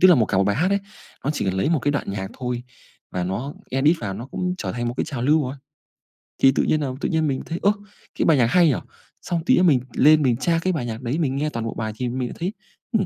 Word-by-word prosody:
tức 185 - +8
là 180 - +8
một 115 -5 +3
cả 95 - 0
1 100 - +4
bài 100 +2 +1
hát 180 +6 +2
ấy, 200 - +3 0.5
nó 140 - +1
chỉ - - -2
cần 95 -1 0
lấy 95 +11 +1
1 165 - +3
cái 145 +3 0
đoạn 145 - -2
nhạc 95 -1 -4
thôi 125 -1 -3 0.5
và 90 -1 -2
nó 120 +11 -3 0.2
edit 145 +6 +3
vào, 100 -3 -3
nó 115 +5 -7
cũng 180 +5 -2
trở - - -3
thành 120 0 -2
1 120 - -3
cái - - 0
trào 140 -6 -4
lưu 150 +4 +4
rồi. 130 +2 -4 0.9
Thì 135 - +7
tự - - +2
nhiên 155 -1 +1
là 140 - -1
tự - - 0
nhiên 160 -2 +1
mình 135 -2 -1
thấy, 165 +2 -4
ơ, 200 - +5 0.5
cái - - +3
bài 160 -4 +5
nhạc 120 - +4
hay 175 +6 +5
nhỉ? 140 - +3 0.5
Xong 170 -2 -2
tí - - +5
nữa 180 - +4
mình 150 -8 +5
lên 155 +2 +6
mình 125 -4 +2
tra 165 +3 +1
cái 185 +1 +1
bài 140 -7 -2
nhạc 115 0 -5
đấy, 125 +5 -2
mình 135 -5 0
nghe 150 +2 0
toàn 115 -5 -4
bộ 115 - -3
bài 110 -1 -4
thì 125 +1 -2
mình 125 0 -2
lại - - -8
thấy, 180 +4 -2 0.4
ừm, 220 -5 +2
135 Hz, 300 wpm, -23 LUFS, 120-160 Hz, 0.9 s, tức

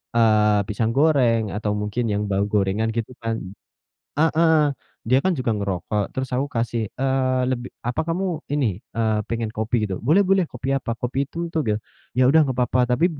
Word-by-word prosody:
eee, 105 -2 +4
pisang 110 +2 0
goreng, 135 -7 +4
atau 105 -1 -1
mungkin 105 +4 -2
yang 100 - 0
bau 100 +1 +1
gorengan 105 +2 +1
gitu 115 +1 -3
kan. 115 0 -1 0.9
Heeh. 160 0 +4 0.6
Dia 130 +2 +4
kan 185 -5 +1
juga 120 -3 0
ngerokok, 100 +1 -1
terus 130 0 -2
aku 135 +3 0
kasih, 115 0 0 0.2
eee, 130 -1 +1
lebih 125 -1 -2 0.2
"Apa 120 - 0
kamu 185 +4 0 0.3
ini, 110 -9 0 0.2
eee 110 -1 +2
pengen 115 -1 -2
kopi 110 0 0
gitu?" 95 -2 -3
"Boleh 170 - +4
boleh! 190 -3 +2
Kopi 130 +2 -3
apa? 115 -4 -2
Kopi 130 +4 -2
itu - - -11 0.2
tuge." 110 -10 0 0.4
"Ya 130 - +5
udah 155 +5 +6
nggak 130 -4 -1
papa, 125 0 +1
tapi 140 +8 +3
120 Hz, 175 wpm, -23 LUFS, 110-135 Hz, 0.9 s, udah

